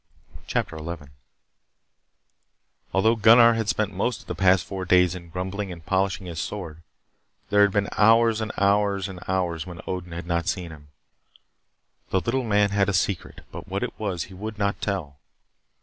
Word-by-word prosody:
CHAPTER 80 - -2
11 80 -2 -7 1.8
Although 110 +5 +3
Gunnar 115 +2 +7
had 110 -2 -2
spent 105 -2 0
most 105 +5 -1
of - - -19
the - - -4
past 95 -3 +3
four 95 +1 -5
days 90 -1 +4
in 85 -2 -9
grumbling 95 +3 -4
and 85 -3 -10
polishing 95 -1 0
his 85 -2 -6
sword, 85 -6 -5 0.7
there 105 0 +5
had 100 - +6
been 100 0 0
hours 115 +1 +4
and 110 0 -3
hours 100 -1 +2
when 90 -2 -3
Odin 90 -2 -5
had 85 0 -6
not 85 -1 -1
seen 90 -3 -2
him. 75 -2 -13 1.2
The 95 - +2
little 125 +7 -1
man 105 -2 +2
had 100 0 +2
a - - 0
secret, 90 0 -1
but - - -9
what - - -3
it - - -5
was 95 -7 -2
he 95 - -12
would 105 +3 -6
not 100 0 -1
tell. 80 -9 -3
95 Hz, 165 wpm, -25 LUFS, 85-105 Hz, 1.8 s, Gunnar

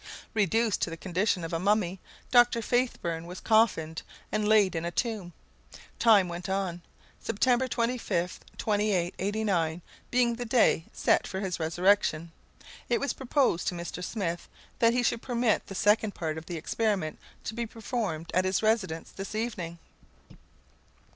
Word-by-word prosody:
Reduced 220 +1 +1
to - - +1
the 165 - -6
condition 185 +1 0
of 165 - -5
a 165 - 0
mummy, 195 -1 +1 0.3
Dr. 240 -1 +5
Faithburn 220 -10 -1
was 180 +1 -7
coffined 165 -8 +2 0.3
and 215 -1 0
laid 210 -4 +4
in 165 - -2
a 170 - -1
tomb. 195 0 -2 0.7
Time 210 -5 +6
went 175 +1 -6
on. 190 -3 -2 0.4
September 245 +4 +1
25th, 230 -8 -1 0.2
2889, 195 -4 0 0.3
being 245 -1 +3
the 245 - -3
day 225 -8 +3
set - - +2
for 190 - -4
his 190 -3 -3
resurrection, 170 0 +2 0.6
it 240 - +2
was 280 -3 -1
proposed 265 - +1
to 180 - 0
Mr. 175 +1 -5
Smith 175 -4 -3 0.3
that 230 0 +5
he 245 0 +1
should 230 -1 +1
permit 240 -3 0
the 195 - -7
second 210 +1 +2
part 160 -2 -3
of 160 0 -8
the 175 - -4
experiment 190 -1 -1 0.2
to - - -4
be 235 0 -3
performed 210 -8 -4
at 185 - +3
his 185 +3 0
residence 205 -7 0
this 195 +2 -7
evening. 185 -7 -3
200 Hz, 150 wpm, -28 LUFS, 175-230 Hz, 0.7 s, Time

